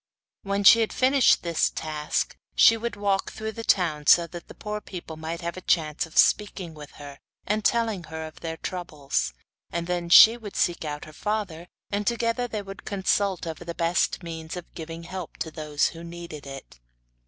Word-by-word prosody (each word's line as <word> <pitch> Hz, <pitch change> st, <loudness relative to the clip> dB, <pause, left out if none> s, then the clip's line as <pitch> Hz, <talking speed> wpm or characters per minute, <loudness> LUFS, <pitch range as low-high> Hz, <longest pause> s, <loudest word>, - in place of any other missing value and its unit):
When 200 Hz, 0 st, -1 dB
she 230 Hz, +4 st, +9 dB
had 225 Hz, -, +1 dB
finished 265 Hz, 0 st, +4 dB
this 170 Hz, -2 st, +1 dB
task 155 Hz, -1 st, -2 dB, 0.2 s
she 230 Hz, -, +7 dB
would 235 Hz, 0 st, -3 dB
take -, -, -10 dB
a -, -, -13 dB
walk 195 Hz, -1 st, +1 dB
through 220 Hz, 0 st, -5 dB
the 230 Hz, +1 st, -7 dB
town, 155 Hz, -8 st, +1 dB
so 170 Hz, -, +7 dB
that 170 Hz, 0 st, -10 dB
the -, -, -12 dB
poor 210 Hz, 0 st, -5 dB
people 175 Hz, -5 st, -8 dB
might 160 Hz, +2 st, -5 dB
have 170 Hz, +1 st, -4 dB
a -, -, -6 dB
chance 155 Hz, -3 st, +1 dB
of 160 Hz, -, -12 dB
speaking 195 Hz, -5 st, +3 dB
with 150 Hz, -2 st, -11 dB
her, 140 Hz, -1 st, -11 dB, 0.3 s
and 210 Hz, +1 st, 0 dB
telling 225 Hz, -7 st, +1 dB
her 160 Hz, 0 st, -6 dB
of 155 Hz, -, -11 dB
their 165 Hz, -1 st, -5 dB
troubles; 145 Hz, -, -3 dB, 0.4 s
and 170 Hz, 0 st, -2 dB
then 175 Hz, -1 st, -2 dB
she 225 Hz, +6 st, +9 dB
would 215 Hz, -4 st, -9 dB
seek 175 Hz, -1 st, +1 dB
out 150 Hz, -1 st, -5 dB
her 155 Hz, -, -13 dB
father, 185 Hz, -3 st, -3 dB, 0.2 s
and 205 Hz, 0 st, -2 dB
together 235 Hz, +1 st, 0 dB
they 215 Hz, -3 st, -4 dB
would 195 Hz, 0 st, -10 dB
consult 195 Hz, -2 st, 0 dB
over 165 Hz, +1 st, -6 dB
the 170 Hz, -1 st, -6 dB
best 170 Hz, +2 st, 0 dB
means 165 Hz, 0 st, -6 dB
of 175 Hz, -, -10 dB
giving 165 Hz, 0 st, -7 dB
help 180 Hz, 0 st, -7 dB
to 160 Hz, -, -4 dB
those 150 Hz, -2 st, 0 dB
who 165 Hz, 0 st, -10 dB
needed 170 Hz, -4 st, -9 dB
it. 135 Hz, -, -10 dB
170 Hz, 200 wpm, -26 LUFS, 160-205 Hz, 0.4 s, she